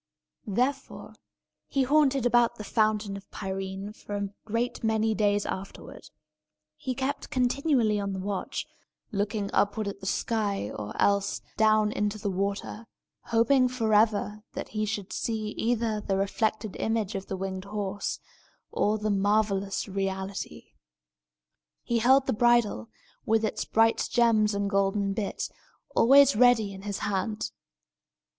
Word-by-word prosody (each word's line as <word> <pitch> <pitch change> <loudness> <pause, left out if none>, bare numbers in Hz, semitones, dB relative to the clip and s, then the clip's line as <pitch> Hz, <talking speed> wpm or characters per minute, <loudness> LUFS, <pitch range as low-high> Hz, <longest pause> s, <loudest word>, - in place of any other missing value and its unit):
Therefore, 255 +7 -2 0.5
he 275 - +1
haunted 275 -2 +3
about 240 -1 +4
the 215 - -7
Fountain 215 -1 +1
of 195 0 -10
Pirene 195 +1 -5
for 205 - -7
a 200 -1 -2 0.2
great 230 +3 -2
many 220 0 +2
days 205 -1 +1
afterward. 190 +1 -7 0.7
He 255 +12 -4
kept 270 +2 -3
continually 250 -4 +2
on 200 -1 -2
the - - -4
watch, 195 0 -3 0.5
looking 205 0 -2
upward 205 +1 +1
at 200 0 -5
the 195 - -7
sky, 205 - -1
or 105 0 -7
else 200 0 +2
down 215 -1 +3
into 210 0 -1
the 205 -1 -2
water, 200 +3 -3 0.4
hoping 250 +3 +3
forever 215 -3 +1
that - - -5
he 215 0 -2
should 205 -2 -4
see 220 -2 -2
either 225 -1 -1
the 195 -1 -1
reflected 215 +1 -1
image 220 -2 -1
of 195 -1 -5
the 190 - -4
winged 190 0 -4
horse, 205 -1 -3 0.5
or 210 +1 +1
the 215 0 -1
marvellous 200 0 +1
reality. 190 - -4 1.1
He 235 -1 0
held 265 +4 +5
the - - 0
bridle, 235 - +2 0.4
with 225 0 +3
its - - -2
bright 225 +1 +2
gems 220 -3 +3
and 200 0 0
golden 200 0 +1
bit, 200 0 -3 0.5
always 275 +2 +6
ready 225 -3 +4
in 190 - -9
his 200 0 -4
hand. 200 - -2
210 Hz, 135 wpm, -27 LUFS, 200-230 Hz, 1.1 s, always